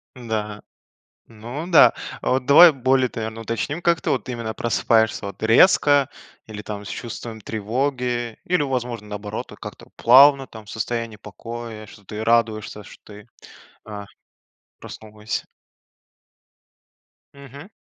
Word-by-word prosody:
Да. 110 -4 -4 0.7
Ну 120 +9 -8
да. 165 - +7 0.3
А - - -2
вот 130 0 0
давай 165 +4 +8
более 130 -1 +1
т 115 - -7
наверно, 110 +1 -5
уточним, 130 +8 -3
как 170 -1 +1
ты - - -2
вот - - -2
именно 115 -3 -4
просыпаешься, 110 -2 +1
вот, 100 - -9
резко 140 +3 +4 0.4
или, 105 -1 -8
там, 105 -1 -7
с - - -9
чувством 115 -1 -7
тревоги, 120 +2 -3
или, 180 -4 +1
возможно, 125 -5 -3
наоборот, 105 0 -6
то - - -13
как-то - - -10
плавно, 135 +2 +6
там, 110 -1 -12
в - - -13
состоянии 115 0 -4
покоя, 110 +2 -9
что 100 0 -16
ты 105 +3 -6
радуешься, 110 -2 0
что - - -15
ты, 105 +1 -14 0.6
а, 105 -1 -7 0.7
проснулась. 110 0 -7 1.9
Мгм. 140 - -12
115 Hz, 135 wpm, -22 LUFS, 110-130 Hz, 1.9 s, давай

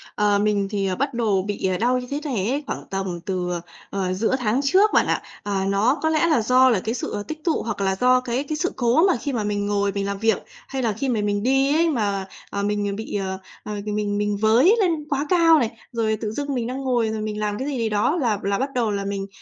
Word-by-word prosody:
ờ, 205 -1 +2
mình 205 -1 +1
thì, 200 -2 -1
ờ, 185 - -1
bắt 275 +1 -1
đồ 215 -5 +1
bị, 200 0 -4
ờ, 185 -1 0
đau 245 +3 +2
như 250 - -7
thế 285 - -1
này 230 -8 -1
ấy 285 +3 -1
khoảng - - -4
tầm 190 -2 -3
từ, 180 -2 -2
ờ, 175 -1 -3 0.3
ờ, 185 -2 -1
giữa 225 +7 +1
tháng 235 +2 +1
trước 385 +9 +4
bạn - - +4
ạ. - - 0 0.2
À, 195 -2 -1
nó 220 +9 +2
có 315 - +3
lẽ 320 +1 +2
là 305 -8 +3
do 255 +3 +5
là 225 -6 +3
cái 225 - -1
sự 205 -4 -4
tích 310 0 -7
tụ 330 - +1
hoặc 215 -3 -4
là 190 -1 +1
do 255 +4 +4
cái 250 +2 -2
cái 305 +2 -4
sự 360 +3 -1
cố 270 +9 +3
mà 355 - +2
khi 280 +3 -4
mà 220 -3 -1
mình 205 0 -1
ngồi 200 -1 +1
mình 200 0 -2
làm 200 0 -2
việc, 225 +1 +1 0.2
hay 270 -1 -3
là 220 -3 +1
khi 270 +5 -2
mà 220 -4 +1
mình 205 0 -1
đi 270 +2 +3
ấy 335 0 +3
mà, 205 -7 -1 0.2
à, 200 - -3
mình 205 -1 -1
bị, 220 -1 -6
ờ, 190 -1 -2 0.3
ờ, 210 - -6
mình 210 -1 -1
mình 205 -1 0
với 235 - +5
lên 330 -6 +1
quá 285 +1 0
cao 330 -3 +5
này, 235 -3 0 0.2
rồi 220 -2 0
tự 215 -1 -2
dưng 285 +3 -3
mình 240 -3 -1
đang 260 +2 -4
ngồi 240 -4 +1
rồi 220 -1 -3
mình 215 0 -3
làm 210 -1 -1
cái 270 - -3
gì 275 -3 -2
gì 225 -2 0
đó 210 +10 +1
là 235 - 0
là 200 0 0
bắt 270 - -1
đầu 235 -4 +1
là 200 -1 -2
mình, 200 0 -3
220 Hz, 270 wpm, -23 LUFS, 205-265 Hz, 0.3 s, do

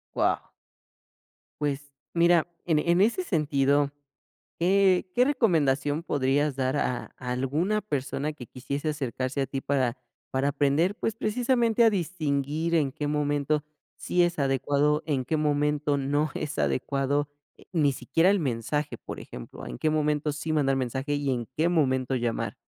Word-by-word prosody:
Wao. - - +1 1.1
Pues, 145 -1 -2 0.2
mira, 170 -1 +4 0.2
en 160 -3 +3
e 150 - -2
en 175 - +3
ese 235 - +2
sentido, 145 - +2 0.7
¿qué 190 +1 +3
qué 250 - +5
recomendación 155 - +2
podrías 145 -1 +1
dar 130 +1 0
a 125 -3 -1
alguna 135 +11 -1
persona, 145 -4 -3
que 130 - -9
quisiese 140 +6 -3
acercarse 130 -2 -3
a 135 - 0
ti 135 0 -4
para 130 -4 0 0.3
para 135 +1 +1
aprender? 145 +7 +2
Pues, 220 0 -2
precisamente, 235 +1 +2
a 230 - +7
distinguir, 160 -3 -1
en 145 -5 +2
qué 150 +1 -4
momento 145 0 0 0.3
sí 180 - +1
es 175 -1 0
adecuado, 145 +2 +1
en 140 -5 0
qué 155 +5 0
momento, 150 -1 +1
no 145 +2 0
es 150 +1 -4
adecuado, 140 +2 0 0.3
eh, - - -18
ni 150 -5 +3
siquiera 165 +6 +1
el 200 -1 +2
mensaje, 135 +2 -2
por - - -8
ejemplo. - - -9
En - - -7
qué 155 - +1
momento, 150 -1 +1
sí 155 +2 -3
mandar 135 -3 +2
mensaje, 130 +3 -2
y 145 -1 -1
en 120 -3 -2
qué 165 +3 +2
momento 130 -6 +1
llamar. 120 -2 -2
145 Hz, 155 wpm, -27 LUFS, 135-165 Hz, 1.1 s, a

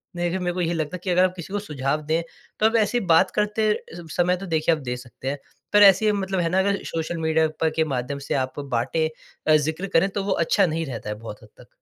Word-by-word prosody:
देखिए 175 +1 -1
मेरे 175 -1 -1
को 180 - -2
यही 170 0 0
लगता 160 +2 -3
कि 180 +2 -6
अगर 180 +1 +4
आप 185 0 +2
किसी 180 +2 -8
को 205 - 0
सुझाव 150 -5 -2
दें 160 +2 +1 0.4
तब 220 +2 +3
ऐसी 225 +3 +2
बात 160 - +5
करते 210 +1 +1 0.4
समय 180 +1 +3
तो 195 - -7
देखिए 160 -1 +2
आप 155 - -9
दे 125 0 -3
सकते 125 +1 -10
हैं। 140 - -2 0.4
पर 205 0 +7
ऐसे 205 +2 +6
मतलब 195 -2 -1
है 170 -1 +1
ना 185 +2 +2
अगर 200 +1 0
सोशल 165 +1 -3
मीडिया 160 0 +2
पर 160 - +3
के 160 - +3
माध्यम 125 +3 -3
से - - +1
आप 130 +1 -2
बाँटें 140 +4 -1 0.4
अ, - - +8
ज़िक्र 160 +5 0
करें 195 +4 +4
तो 195 0 -3
वो 195 - -2
अच्छा 200 +3 +3
नहीं 165 -1 -2
रहता 115 -5 -6
है 105 - -3
बहुत 105 0 -10
हद 110 - -16
तक। - - -15
165 Hz, 250 wpm, -24 LUFS, 150-190 Hz, 0.4 s, अ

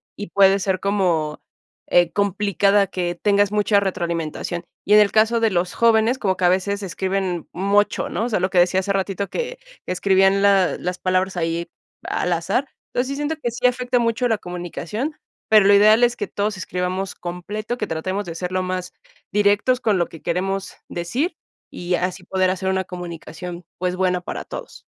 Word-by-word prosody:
y 205 - -7
puede 195 +1 +5
ser 190 -1 0
como, 180 -7 0 0.5
eh, 175 -1 +3
complicada 200 0 +2
que 175 -2 -2
tengas 205 -1 +3
mucha 210 -1 +3
retroalimentación. 170 -3 -3 0.2
Y 205 - +3
en 210 - +9
el 205 - +3
caso 220 +2 +3
de 225 -1 +2
los 180 0 0
jóvenes, 230 +2 +3
como 190 -6 0
que 185 - +1
a - - +6
veces 200 +2 0
escriben 190 -2 -2
mocho. 200 +3 +1
¿no? 225 - -2
O - - -2
sea, 215 - +1
lo 185 +1 0
que 185 - -2
decía 180 +1 +4
hace 200 +1 -1
ratito, 195 0 -2
que - - -4 0.3
que - - -4
escribían 195 +1 +3
la, 195 -3 +4
las 180 0 -3
palabras 185 0 0
ahí 170 0 -2 0.3
al 180 - -1
azar. 170 +11 -1 0.3
Entonces, 250 +1 0
sí 275 - -2
siento 295 +2 -2
que 265 -6 -3
sí 245 +2 +2
afecta 250 0 0
mucho 235 +1 +1
la 225 -2 +1
comunicación, 180 - -5 0.3
pero 215 -2 +6
lo 200 - +6
ideal 215 +3 +6
es 240 0 +3
que - - -4
todos 205 +1 -2
escribamos 185 +1 -3
completo, 205 +7 -5
que 215 - -3
tratemos 185 +5 -3
de 170 -2 -6
ser 180 +1 -4
lo 185 0 0
más 185 0 -4 0.4
directos 205 +5 +3
con 215 -5 +2
lo 175 - +1
que 165 - -13
queremos 195 +3 -2
decir, 235 - -2 0.3
y 175 0 -2
así 180 +1 -3
poder 185 -1 +1
hacer 190 0 -2
una 190 0 0
comunicación, 175 0 -8
pues, 180 0 -1
buena 180 -1 +1
para - - -6
todos. - - -9
195 Hz, 190 wpm, -21 LUFS, 180-210 Hz, 0.5 s, en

